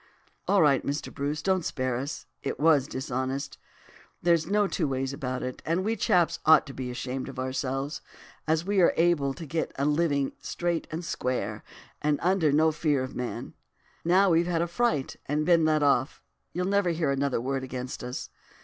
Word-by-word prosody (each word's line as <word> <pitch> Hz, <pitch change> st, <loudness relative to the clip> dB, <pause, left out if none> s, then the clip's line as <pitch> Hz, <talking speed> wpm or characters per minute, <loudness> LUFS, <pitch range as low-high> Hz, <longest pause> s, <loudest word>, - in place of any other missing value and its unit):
"'All 200 Hz, -4 st, +5 dB
right, 140 Hz, -3 st, +4 dB
Mr. 140 Hz, +2 st, -3 dB
Bruce, 145 Hz, +2 st, -3 dB
don't 190 Hz, -2 st, +1 dB
spare 130 Hz, -4 st, -1 dB
us. 130 Hz, +1 st, -4 dB, 0.2 s
It -, -, -4 dB
was 145 Hz, -3 st, +4 dB
dishonest, 130 Hz, +1 st, -3 dB, 0.6 s
there's 170 Hz, -2 st, +2 dB
no 205 Hz, +2 st, +3 dB
two 175 Hz, -5 st, -1 dB
ways 135 Hz, 0 st, -2 dB
about 130 Hz, -3 st, -3 dB
it, 125 Hz, 0 st, -5 dB
and 170 Hz, +4 st, 0 dB
we 225 Hz, +1 st, +1 dB
chaps 175 Hz, -6 st, +2 dB
ought 160 Hz, 0 st, +6 dB
to 135 Hz, -, -9 dB
be 130 Hz, -2 st, -5 dB
ashamed 130 Hz, +2 st, -4 dB
of 135 Hz, -, -10 dB
ourselves, 135 Hz, +2 st, -2 dB, 0.5 s
as 160 Hz, +1 st, +2 dB
are 200 Hz, +3 st, -1 dB
well 185 Hz, -3 st, +6 dB
able 160 Hz, -5 st, +2 dB
to 165 Hz, -, -7 dB
get 160 Hz, +3 st, -2 dB
a 140 Hz, -, 0 dB
living 145 Hz, -2 st, +1 dB
straight 175 Hz, -1 st, -2 dB
and 165 Hz, +2 st, -5 dB
square, 115 Hz, -8 st, -2 dB, 0.4 s
and 150 Hz, -1 st, +2 dB
under 180 Hz, -3 st, +3 dB, 0.2 s
fear 150 Hz, -4 st, +1 dB
of 130 Hz, -, -7 dB
no 125 Hz, -, -2 dB
man. 120 Hz, -, -6 dB, 0.5 s
Now 185 Hz, +3 st, +4 dB
we've 170 Hz, +1 st, +3 dB
had 170 Hz, -1 st, +1 dB
a -, -, -2 dB
fright 170 Hz, -, 0 dB
and 150 Hz, +2 st, 0 dB
been 170 Hz, -2 st, +4 dB
let 155 Hz, -1 st, +3 dB
off 140 Hz, -2 st, +1 dB, 0.3 s
you'll 180 Hz, +1 st, -2 dB
never 200 Hz, -1 st, +2 dB
hear 160 Hz, -4 st, 0 dB
another 140 Hz, -1 st, 0 dB
word 135 Hz, +2 st, -2 dB
against 125 Hz, -1 st, -5 dB
us. 125 Hz, +1 st, -5 dB
150 Hz, 185 wpm, -27 LUFS, 130-170 Hz, 0.6 s, ought